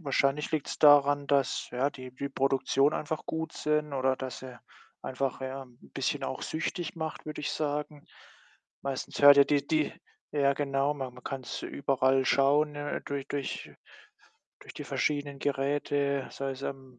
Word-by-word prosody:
wahrscheinlich 140 -1 +1
liegt's 155 -3 -2
daran, 145 -1 +6
dass, 140 -2 +1
ja, 130 +3 0
die 130 -2 -9
die 140 +2 -4
Produktionen 135 +1 +2
einfach 155 +1 -3
gut 160 0 -3
sind, 150 -1 0
oder 130 -1 +1
dass 130 -2 -5
sie 130 -2 -10 0.4
einfach, 130 0 -2
ja, 130 +1 -4
'n 120 -2 -21
bisschen - - -1
auch - - -4
süchtig 165 +2 -3
macht, 160 -1 -5
würde 155 - -5
ich 145 - -2
sagen. 150 -1 -3 0.8
Meistens 135 -1 -4
hört 145 0 +10
ja 140 - +9
die 145 0 +1
die 155 -1 +1 0.4
ja, 140 -1 +3
genau, 140 0 0
man 135 -3 -5
man 125 - -13
kann's 130 -3 -5
überall 135 -1 +1
schauen, 145 +2 +3
äh, 145 0 -3
durch 140 -1 -4
durch 140 -2 -4 0.9
durch - - -12
die - - -6
verschiedenen 145 -2 -1
Geräte, 140 0 0
sei 135 0 -3
es 135 +1 -10
im 130 -3 -6
140 Hz, 165 wpm, -29 LUFS, 135-145 Hz, 0.9 s, hört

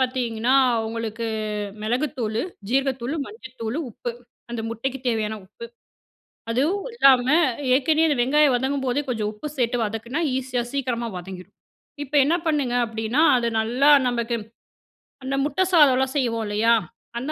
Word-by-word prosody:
பாத்தீங்கன்னா, 250 -2 0 0.3
உங்களுக்கு 230 0 -4 0.6
மிளகுத்தூளு, 235 -1 -1 0.3
ஜீரகத்தூளு, 265 +1 0
மஞ்சள் 260 - -12
தூளு, 225 +7 -2
உப்பு. 240 +2 -5 0.4
அந்த 240 -1 -3
முட்டைக்கு 260 +4 -3
தேவையான 220 -2 -1
உப்பு. 225 +4 -10 0.9
அதுவும் 325 - 0
இல்லாம, 260 - +5 0.5
ஏற்கனவே 315 +4 +3
அந்த 290 - +1
வெங்காயம் 280 +1 +4
வதங்கும்போதே 265 +1 0
கொஞ்சம் 220 -3 -1
உப்பு 210 +8 -7
சேத்து 245 -1 +1
வதக்குனா, 225 +7 -3 0.2
ஈஸியா 255 -2 -2
சீக்கிரமா 245 -4 -2
வதங்கிடும். 180 0 -10 0.5
இப்போ 290 +1 -6
என்ன 320 +4 +2
பண்ணுங்க 285 -6 0
அப்படின்னா, 225 +5 -1 0.2
அது 235 - 0
நல்லா 250 +6 +3 0.2
நமக்கு, 235 -1 -1 0.9
அந்த 265 +1 -2
முட்டை 300 +6 +1
சாதம்லாம் 265 -4 +4
செய்வோம் 230 -4 0
இல்லையா, 215 +3 +3 0.5
அந்த 275 +5 -4
250 Hz, 130 wpm, -23 LUFS, 230-275 Hz, 0.9 s, இல்லாம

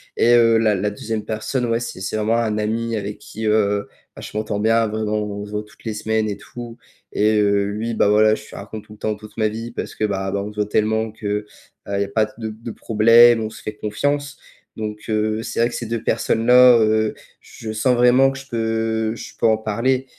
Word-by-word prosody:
et 120 - +4
heu, 115 -1 +5
la 110 -2 +3
la 105 +2 -1
2e 110 +1 -4
personne, 110 +4 -2
ouais, 115 -1 0
c'est 120 - -6
c'est 95 +3 -4
vraiment 110 +2 +1
un 110 -2 0
ami 115 +2 -1
avec 105 0 -5
qui, 110 0 -6
heu, 105 -1 +1 0.3
bah - - -10
je - - -7
m'entends 105 -1 -2
bien, 115 +2 +3
vraiment, 110 0 -2
on 105 -1 -5
se - - -12
voit 105 0 -3
toutes 105 - -21
les 110 -2 -3
semaines 110 0 -1
et 100 - -4
tout 120 +2 -10 0.3
et 105 0 +2
heu, 100 -1 +2
lui, 110 +3 -3
bah 105 - +3
voilà, 110 +1 +5
je - - -10
lui - - -12
raconte 110 -1 -8
tout 105 - -14
le 105 - -17
temps 110 -1 -1
toute 105 0 -14
ma 110 -1 +2
vie 115 +2 -5
parce - - -6
que, - - -3
bah, 95 -2 -1
bah, 100 +1 -2
on 105 - -6
se - - -23
voit 105 0 0
tellement 110 +1 +1
que, 110 0 -12
heu, 105 +1 -1 0.4
il 100 0 -1
y - - +3
a - - -4
pas 110 +2 +1
de 110 -2 -4
de 110 +2 -8
problème, 115 +2 +5
on 110 - -3
se 110 - -13
fait 105 - -5
confiance, 145 +7 -2 0.4
donc 105 -1 -5
heu, 110 0 0
c'est - - -5
vrai 120 +1 +3
que - - -10
ces 120 - -4
2 115 0 -3
personnes-là, 125 +2 +5
heu, 110 0 +2 0.3
je 110 - -8
sens 115 +4 +2
vraiment 125 +2 +5
que 135 - -6
je 135 0 -11
peux 110 -1 -1
je - - -9
peux 115 - +3
en 110 -1 +3
parler 115 +5 0
110 Hz, 245 wpm, -21 LUFS, 105-115 Hz, 0.4 s, heu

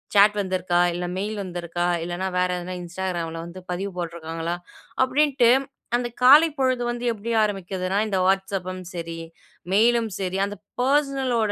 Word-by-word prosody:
Chat 205 +1 +7
வந்திருக்கா 185 -2 +1
இல்ல 175 0 -3
mail 210 +3 -2
வந்துருக்கா, 175 -1 -3 0.2
இல்லனா 175 +2 -3
வேற 180 0 +2
எதுனா 180 +1 -5
Instagramல 170 -2 -4
வந்து 175 +2 -9
பதிவு 195 +3 -3
போட்ருக்காங்களா. 165 0 -4 0.5
அப்டின்ட்டு 265 -3 +3 0.5
அந்த 245 0 -2 0.2
காலைப்பொழுது 270 -3 +5
வந்து 240 0 -4
எப்டி 225 +2 -5
ஆரம்பிக்குதுன்னா 190 -2 -2
இந்த 200 -3 0
"Whatsapp"ம் 190 -1 -1
சரி, 165 -1 -5 0.5
மெயிலும் 230 +1 +3
சரி, 190 0 -2
அந்த 205 - -6 0.3
பர்ஸ்னலோட, 265 -5 +1
190 Hz, 130 wpm, -24 LUFS, 175-235 Hz, 0.5 s, Chat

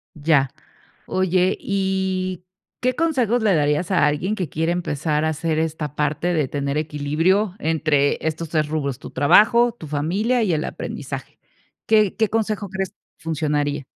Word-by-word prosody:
Ya, 145 -3 +2 0.6
oye, 185 0 +1
¿y, 190 -2 -1 0.4
qué 255 0 +1
consejos 250 -7 +1
le 210 -3 +3
darías 150 +3 +1
a 185 - +4
alguien 155 +8 0
que 185 -6 -3
quiere 160 +4 -1
empezar 155 -3 -1
a 160 - +2
hacer, 160 0 -1
esta 160 -2 -2
parte 150 +4 0
de 150 -5 +1
tener 140 0 -2
equilibrio 155 +7 +1
entre 155 -4 +1
estos 160 +1 -2
3 155 -2 +1
rubros?, 140 -4 -2
tu - - -10
trabajo, 235 +10 +5
tu 215 -9 -11
familia 190 - 0
y 200 -5 +1
el 155 -1 0
aprendizaje, - - -6 0.5
¿qué 215 -3 +4
qué 220 -1 +2
consejo 215 -2 -1
crees 190 0 -4 0.2
funcionaría? 150 -3 -1
165 Hz, 150 wpm, -22 LUFS, 150-195 Hz, 0.6 s, trabajo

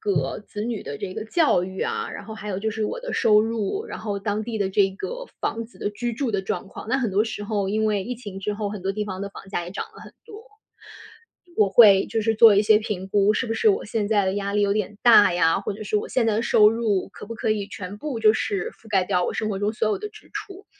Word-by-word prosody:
个 145 -10 -1
子 210 0 -7
女 235 -3 -3
的 140 - -6
这 185 -2 -5
个 215 - -5
教 255 - +2
育 190 0 -7
啊， - - -2
然 - - -7
后 220 +1 -8
还 210 -1 -8
有 190 -1 -2
就 220 +2 -1
是 220 0 -2
我 - - -3
的 - - -6
收 210 -1 +4
入， 225 - -2
然 - - -7
后 205 -2 -3
当 210 +1 -2
地 225 -1 -4
的 195 -1 0
这 195 0 +3
个 - - -6
房 230 0 -2
子 235 - -18
的 205 - -2
居 240 +3 -3
住 250 +1 -2
的 200 -2 0
状 190 -1 -4
况。 - - -10
那 265 - +1
很 235 -5 -1
多 200 +3 +2
时 215 -2 -5
候 205 -2 -1
因 215 +2 0
为 205 -3 0
疫 250 - -4
情 205 -5 -8
之 205 +1 -2
后， 205 -1 -3
很 205 -3 -7
多 195 +1 -1
地 210 +1 -3
方 190 -2 -6
的 200 - -4
房 195 - -12
价 175 -3 -3
也 175 - -8
涨 195 - -4
了 - - -12
很 - - -13
多， 435 +2 -11 1.1
我 205 -2 +4
会 200 -3 +7
就 225 -1 -1
是 225 +1 +1
做 220 -2 +8
一 205 - +5
些 215 0 +5
评 200 -3 -5
估， 205 +1 +3
是 255 - -1
不 - - 0
是 440 - +3
我 400 - +2
现 210 -1 -2
在 205 -3 +3
的 190 +1 0
压 200 0 -2
力 205 - +2
有 200 - +2
点 210 0 -2
大 225 -6 +7
呀， 165 -1 +3
或 200 - -3
者 210 +2 -8
是 210 - 0
我 - - -2
现 250 -3 +1
在 215 -1 +2
的 225 - 0
收 210 -2 +5
入 220 -5 0
可 - - -10
不 230 - -6
可 225 - -2
以 210 -2 -1
全 205 -3 -7
部 265 -5 -4
就 215 -1 +6
是 200 -3 -2
覆 225 - -19
盖 195 -3 +2
掉 180 -2 +1
我 - - -2
生 215 - -1
活 195 -2 -2
中 205 +1 0
所 220 -1 0
有 215 - 0
的 420 +1 -5
支 430 0 -17
出。 390 +1 -8
210 Hz, 310 characters per minute, -24 LUFS, 200-225 Hz, 1.1 s, 做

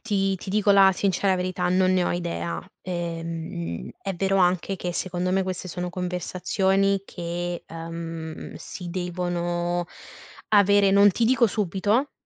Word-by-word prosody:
ti 195 -3 0
ti 190 - -10
dico 205 0 +2
la 195 -1 +7
sincera 190 0 +1
verità: 180 0 -1
non 185 +1 +3
ne 185 -1 +2
ho - - 0
idea. 85 - -3 0.2
Ehm, 165 - -4
è 195 -1 -3
vero 195 +2 +1
anche 185 +1 +2
che, 180 -1 -3
secondo 180 0 -2
me, 190 +1 +2
queste 185 -1 -4
sono 180 0 -4
conversazioni 190 +2 0
che, 175 -1 -4
ehm, 165 -1 -7
si 180 -2 -8
devono 175 -1 -2 0.6
avere, 200 -1 +5
non 200 +1 +7
ti 230 +5 0
dico 240 -1 +4
subito, 210 +6 0
180 Hz, 140 wpm, -25 LUFS, 175-195 Hz, 0.6 s, la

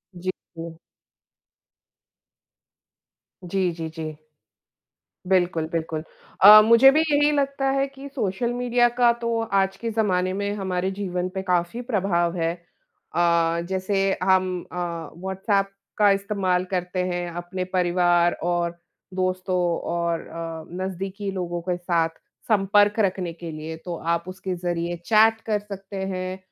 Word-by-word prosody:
जी। 185 +1 -3 0.3
क 165 0 -7 2.7
जी, 180 0 0
जी, 165 -1 -5
जी। 155 -1 -6 1.1
बिल्कुल, 175 -3 +2
बिल्कुल। 160 -1 -3 0.4
अ, 210 +1 +12
मुझे 230 +4 +8
भी - - +5
यही 295 -2 +3
लगता 275 -1 0
है 275 0 +1
कि 275 +1 -10
सोशल 235 -3 -2
मीडिया 245 0 +3
का 240 -1 +6
तो 235 0 0 0.2
आज 195 0 -1
के 230 +3 -4
ज़माने 185 -4 +1
में 200 +1 -2
हमारे 190 -2 -2
जीवन 180 -2 -2
पे 190 - -2
काफ़ी 180 +4 0
प्रभाव 180 -5 +1
है। 165 -1 0
अ, 170 -1 -1
जैसे 190 +1 -1 0.2
हम 185 -1 +3 0.2
अ, 170 -3 -4
व्हाट्सएप 195 +2 -1 0.3
का 205 -1 +6
इस्तेमाल 195 -2 0
करते 180 0 -2
हैं 175 -1 -2
अपने 175 +2 -4
परिवार 175 -1 +3
और 175 0 -1 0.4
दोस्तों 185 0 -1 0.3
और 170 -1 0
अ, 165 -1 -6 0.2
नज़दीकी 195 +2 -4
लोगों 175 -2 -3
के 180 - +1
साथ 170 -2 +1 0.4
संपर्क 205 0 +3
रखने 185 -4 0
के 170 0 -8
लिए 155 +1 -6
तो 175 -2 -4 0.2
आप 170 0 -3
उसके 185 0 -4
ज़रिये 175 0 -2
चैट 225 0 +5
कर 215 -2 +1
सकते 200 -1 -9 0.2
हैं। 185 0 -4
185 Hz, 135 wpm, -24 LUFS, 175-205 Hz, 2.7 s, अ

